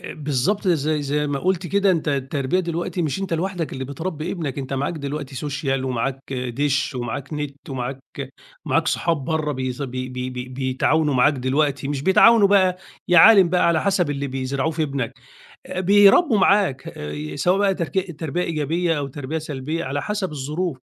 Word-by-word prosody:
آآ، - - -7
بالضبط 150 - -1
زي 155 -2 +1
زي 150 +1 -1
ما 145 -1 -2
قُلت 185 +3 0
كده 200 +2 +2
أنت 165 -4 0
التربية 140 +4 0
دلوقتي 175 +1 -3
مش 155 +4 -2
أنت 195 -2 -4
لوحدك 175 0 -2
اللي 130 - -4
بتربي 155 +4 -4
ابنك 155 -7 -4
أنت 135 0 -5
معاك 140 +5 -1
دلوقتي 140 -2 -5
Social 135 -1 -2
ومعاك 130 +2 -3
دِشّ 135 +3 -1
ومعاك 125 +2 -4
نت 145 -1 -6
ومعاك 130 0 -4 0.6
ومعاك - - +1
صحاب 165 -6 0
بره 155 -2 -1
بيز 130 0 -4
بي 130 -1 -4
بي 125 0 -4
بي 125 0 -6
بيتعاونوا 135 +4 0
معاك 130 +4 +4
دلوقتي، 135 +2 0
مش 140 -2 -2
بيتعاونوا 200 +4 +6
بقى، 185 -2 +3 0.3
يا 175 -1 +6
عالِم 195 -3 +8
بقى 180 +1 +2
على 160 -2 +2
حسب 185 -6 +1
اللي 140 0 -2
بيزرعوه 135 +3 -2
في 160 0 -2
ابنك. 135 -6 -2 0.5
آآ، 185 - -4
بيربوا 205 - +5
معاك 195 -9 +2
آآ، 75 +1 -6
سواء 180 +2 +2
بقى 200 -1 +3
تر 170 -3 -2 0.3
تربية 165 +2 -2
إيجابية 165 +2 0
أو 140 -1 -2
تربية 145 +3 -5
سلبية 155 +2 -4
على 140 +2 -3
حسب 200 +1 -2
الظروف. 150 +3 -3
150 Hz, 180 wpm, -22 LUFS, 135-175 Hz, 0.6 s, عالِم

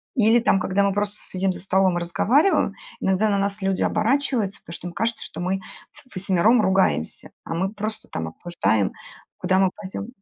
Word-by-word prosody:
Или 230 -1 +5
там, 225 -4 +3
когда 190 +2 +1
мы 200 -1 +2
просто 205 0 -2
с - - -1
сидим 190 0 0
за - - -6
столом 190 -1 +2
и - - -2
разговариваем, 260 - +2 0.3
иногда 190 +3 +1
на 200 - +2
нас 200 +1 0
люди 190 -1 0
оборачиваются, 225 -2 +1
потому 165 - -11
что 175 - -7
им 175 - -7
кажется, 225 +5 -2
что - - -9
мы 185 +2 -1 0.3
в 255 - -18
ввосьмером 195 +5 +3
ругаемся, 135 - +1 0.2
а - - -4
мы 190 +4 -1
просто 215 +1 -5
там 80 -1 -4
обсуждаем, 105 - 0 0.5
куда 185 - +1
мы 190 -1 +4
пойдем. 205 0 -6
195 Hz, 195 wpm, -23 LUFS, 180-215 Hz, 0.5 s, Или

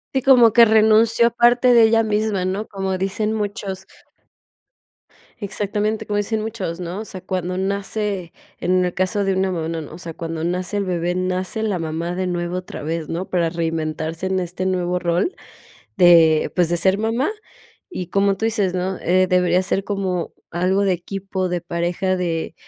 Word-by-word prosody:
Sí, 265 - +2
como 245 -4 +6
que 235 - +8
renunció 220 +1 +4
parte 240 +1 +4
de 235 - +7
ella 225 0 +4
misma, 210 -3 0
¿no? 195 +4 -2
Como 190 -1 -3
dicen 210 +3 -1
muchos. 200 -3 -4 1.5
Exactamente 210 +1 -2
como 205 0 -2
dicen 215 +1 -1
muchos, 215 -6 -4
¿no? 180 +3 -5
O 220 - -6
sea, 185 -3 -7
cuando 185 -1 -3
nace 200 -1 -2 0.3
en 185 +1 +2
el 180 - -2
caso 185 +2 0
de 195 - +1
una 190 0 0
mamá, 165 -3 -3
no, 165 -1 -3
no, 150 - -8
no. - - -10
O - - -10
sea, 170 -2 -7
cuando 165 0 -5
nace 180 +3 -2
el 200 - -1
bebé, 175 -1 -1
nace 185 +3 -2
la 205 -5 -1
mamá 165 +2 -3
de 185 0 -2
nuevo 175 0 -2
otra 185 -4 -7
vez, 160 0 -3
¿no? 175 +3 -4
Para 170 -2 +1
reinventarse 160 +1 -3
en 190 0 0
este 180 +1 -4
nuevo 180 -1 0
rol 175 - 0 0.6
de, 165 -4 +5
pues, 175 -3 +2
de 175 - 0
ser 190 +3 +2
mamá 230 - 0 0.6
y, 180 - -5
como 200 0 +2
tú 220 - -4
dices, 205 -5 0
¿no?, 185 +1 -2
eh, 185 +2 +3
debería 180 0 +3
ser 195 - 0
como 190 -4 -2 0.2
algo 185 +3 +1
de 195 -2 +2
equipo 190 +1 -3
de 175 0 -2
pareja 175 +2 -1
de: 170 -2 -2
185 Hz, 185 wpm, -21 LUFS, 175-205 Hz, 1.5 s, que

